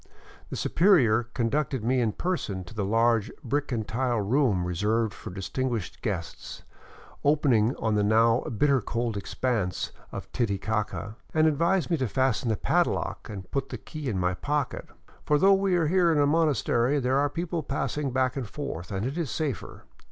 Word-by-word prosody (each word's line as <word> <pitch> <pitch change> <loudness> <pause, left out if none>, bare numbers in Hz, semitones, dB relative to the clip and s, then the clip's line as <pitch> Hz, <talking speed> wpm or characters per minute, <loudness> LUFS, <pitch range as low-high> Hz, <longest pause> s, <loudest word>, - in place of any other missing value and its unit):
The - - -5
superior 125 - +3
conducted 130 +1 0
me 125 +2 +2
in 110 -3 +1
person 130 - -2
to 90 - -12
the 105 -2 -2
large 115 +1 +2
brick 145 +3 -1
and 110 -3 -2
tile 120 -1 0
room 105 -4 +2
reserved 105 +5 0
for - - -9
distinguished 105 +1 -3
guests, 95 -6 -5 0.6
opening 135 -6 +3
on 110 -1 -1
the 105 - +2
now 115 +3 +4
bitter 140 0 +2
cold 115 +1 -2
expanse 100 -2 -2 0.2
of - - -6
Titicaca, 110 0 -2 0.2
and 155 0 +4
advised 170 +4 +2
me 165 - +3
to 130 -3 0
fasten 130 +1 +1
the 110 - +1
padlock - - 0
and 95 -3 -8
put 135 -1 -2
the - - -5
key 150 -4 -6
in 105 - -1
my 90 0 +1
pocket, 145 +7 -2 0.2
" - - -26
for 150 - +4
though 195 +6 +6
we 195 -1 +2
are 170 -2 +2
here 175 +1 +3
in 160 - +2
a 145 - +4
monastery, 145 -4 +2
there 130 +1 +1
are 145 0 +2
people 170 +2 -3
passing 140 0 -2
back 130 0 0
and 130 -6 -4
forth, 110 - -6
and 95 +2 -2
it 140 +7 -3
is 160 -6 -2
safer. 140 - -4
125 Hz, 180 wpm, -27 LUFS, 110-145 Hz, 0.6 s, though